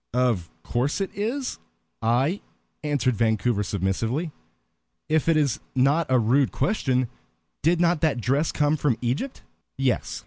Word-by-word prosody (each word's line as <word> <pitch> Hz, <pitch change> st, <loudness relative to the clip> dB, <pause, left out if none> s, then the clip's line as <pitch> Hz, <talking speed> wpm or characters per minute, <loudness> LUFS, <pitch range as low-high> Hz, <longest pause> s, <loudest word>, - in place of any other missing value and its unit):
"Of 120 Hz, -9 st, +1 dB
course 130 Hz, +9 st, -1 dB
it 195 Hz, -, -2 dB
is 240 Hz, +7 st, -2 dB, 0.4 s
I," 130 Hz, -, +1 dB, 0.4 s
answered 140 Hz, -5 st, +1 dB
Vancouver, 110 Hz, -1 st, +1 dB
submissively. 105 Hz, -, -1 dB, 0.8 s
"If 160 Hz, +1 st, +2 dB
it 165 Hz, -, +4 dB
is 140 Hz, -6 st, +1 dB, 0.2 s
not 140 Hz, +5 st, +3 dB
a 130 Hz, -, +4 dB
rude 125 Hz, +4 st, +3 dB
question, 130 Hz, -, +1 dB, 0.5 s
did 165 Hz, +3 st, +3 dB
not 170 Hz, -2 st, +2 dB
that 155 Hz, -6 st, +2 dB
dress 140 Hz, +7 st, +1 dB
come 150 Hz, +1 st, +2 dB
from 145 Hz, -6 st, +1 dB
Egypt?" 130 Hz, -, -2 dB, 0.3 s
"Yes." -, -, 0 dB
135 Hz, 135 wpm, -25 LUFS, 120-160 Hz, 0.8 s, it